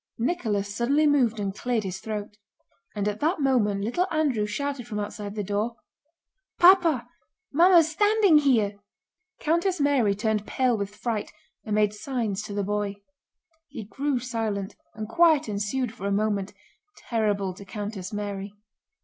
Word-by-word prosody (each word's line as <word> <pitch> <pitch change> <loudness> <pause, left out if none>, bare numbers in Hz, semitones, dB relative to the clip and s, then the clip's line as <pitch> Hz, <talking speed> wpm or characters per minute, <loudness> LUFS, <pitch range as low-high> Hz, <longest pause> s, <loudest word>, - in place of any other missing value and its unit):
Nicholas 215 - -1
suddenly 280 +7 +2
moved 255 -7 +3
and 200 -1 -2
cleared 240 -2 -1
his 190 -1 -5
throat. 210 -1 -5 0.6
And 205 -1 -1
at 210 0 -2
that 325 +4 +1
moment 230 -8 +2
little 350 - 0
Andrew 280 -10 +1
shouted 275 +1 -3
from 215 -3 -5
outside 205 0 -5
the 210 - -2
door: 205 +4 -2 0.8
"Papa! 345 -9 +5 0.5
Mamma's 335 0 +6
standing 415 -2 +4
here!" 220 -8 +2 0.6
Countess 340 +3 +1
Mary 270 -8 +2
turned 210 0 -1
pale 255 -2 +1
with 200 -1 -4
fright 220 -1 -3 0.3
and 210 - -1
made 210 -1 +2
signs 215 -3 -3
to 210 -1 -7
the 205 - 0
boy. 205 0 -2 0.7
He - - -7
grew 275 +6 -2
silent, 225 -5 -3 0.2
and 215 0 -5
quiet 315 +2 +4
ensued 215 +4 -2
for 200 -2 -5
a - - -1
moment, 200 -1 0 0.5
terrible 205 -4 -1
to 190 - -11
Countess 205 -2 -6
Mary. 205 -1 -5
220 Hz, 150 wpm, -26 LUFS, 205-280 Hz, 0.8 s, Mamma's